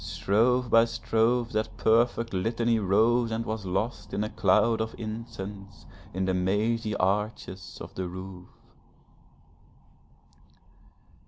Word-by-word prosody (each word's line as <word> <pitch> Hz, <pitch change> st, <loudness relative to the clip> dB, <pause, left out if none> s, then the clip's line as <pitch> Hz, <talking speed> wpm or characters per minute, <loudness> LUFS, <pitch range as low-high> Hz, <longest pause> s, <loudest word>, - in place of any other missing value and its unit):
Strophe 125 Hz, +5 st, +1 dB
by 115 Hz, 0 st, +5 dB
strophe 115 Hz, +1 st, 0 dB
that 110 Hz, 0 st, -2 dB
perfect 115 Hz, 0 st, +2 dB
litany 115 Hz, +4 st, +1 dB
rose 110 Hz, +4 st, +3 dB
and 115 Hz, +1 st, -2 dB
was 110 Hz, -3 st, -4 dB
lost 100 Hz, +2 st, -3 dB
in 105 Hz, -, 0 dB
a 105 Hz, -, -4 dB
cloud 105 Hz, +3 st, +3 dB
of 110 Hz, 0 st, -4 dB
incense, 105 Hz, -3 st, -7 dB, 0.3 s
in 95 Hz, +1 st, -2 dB
the 95 Hz, -, 0 dB
mazy 105 Hz, +4 st, 0 dB
arches 95 Hz, -1 st, -2 dB
of -, -, -9 dB
the 95 Hz, -1 st, -4 dB
roof. 90 Hz, 0 st, -8 dB
110 Hz, 115 wpm, -27 LUFS, 95-115 Hz, 0.3 s, by